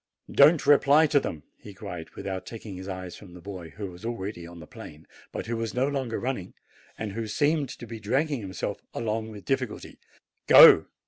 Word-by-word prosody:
"Don't 150 +2 +5
reply 145 +2 +5
to 150 -1 +3
them!" 80 - -6 0.2
he 100 -2 -12
cried, 90 -5 -8
without 95 -2 -5
taking 110 -4 -8
his 95 +1 -8
eyes 95 -2 -6
from 90 -4 -14
the - - -10
boy, 90 -2 -8
who 100 -3 -5
was 90 +3 -14
already 100 -6 -5
on 85 0 -12
the 80 - -10
plain, 75 0 -12 0.3
but - - -5
who 115 +1 -3
was 115 0 -4
no 130 +2 +1
longer 135 -5 -2
running, 125 -8 -4 0.4
and 110 -2 -4
who 110 +2 -4
seemed 145 +4 +1
to - - -9
be 115 -1 -8
dragging 135 +5 -1
himself 100 +1 -5
along 110 -1 -2
with 105 -3 -11
difficulty. 130 -4 -3 0.5
"Go! - - +9
110 Hz, 195 wpm, -26 LUFS, 95-130 Hz, 0.5 s, Go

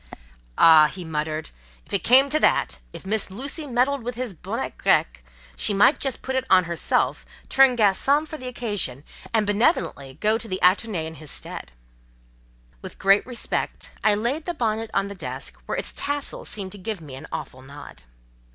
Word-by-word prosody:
"Ah!" 160 -2 +8
he 180 +3 -8
muttered, 155 0 -3 0.3
"if - - -14
it 200 - 0
came 265 +3 +6
to 300 +2 +1
that—if - - 0
Miss 210 +1 0
Lucy 275 - -5
meddled 260 +2 +1
with 240 +1 -5
his 245 -3 -4
bonnet 165 - -5
grec—she - - 0
might 205 +9 +5
just 270 -3 -3
put 265 - -3
it 260 - +1
on 185 -1 +6
herself, 170 -1 0 0.3
turn 265 -2 +5
garçon 265 +9 +3
for 310 - -7
the 255 - -7
occasion, 205 - -3 0.3
and 220 -2 +2
benevolently 205 - 0
go 215 +2 +2
to 230 - -5
the 185 - -2
Athénée 185 -2 +2
in 160 - -7
his 155 - -9
stead." - - -5 1.1
With - - -9
great 195 +3 +3
respect, 245 -2 -3
I 215 -1 +4
laid 250 +9 -2
the 350 - -3
bonnet 225 -4 -1
on 195 - 0
the 200 - -7
desk, 185 - -6
where - - -2
its - - -2
tassel 285 0 -2
seemed 195 -3 -1
to 205 - -8
give 210 +1 -4
me 150 -5 -11
an 135 - -9
awful 130 - -6
nod. 140 - -12
205 Hz, 180 wpm, -24 LUFS, 160-250 Hz, 1.1 s, Ah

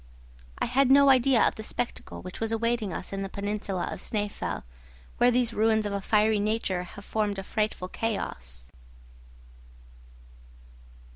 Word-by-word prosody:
I - - 0
had 260 +2 +3
no 280 +1 +7
idea 260 -2 +5
of - - 0
the - - -8
spectacle 240 +2 -4
which 185 0 -8
was 225 0 -1
awaiting 230 -2 0
us 185 - -5
in 195 - -2
the 195 - -3
peninsula 200 -2 -3
of - - -5
Snæfell, 205 -2 -3 0.5
where 245 - +5
these 245 -1 +2
ruins 220 0 +2
of 205 - -2
a 200 - -2
fiery 215 +1 +3
nature 205 -3 0
have 200 +3 -10
formed 210 -2 -1
a 195 - -4
frightful 210 -2 -2
chaos. 60 - -4
215 Hz, 150 wpm, -27 LUFS, 195-230 Hz, 0.5 s, no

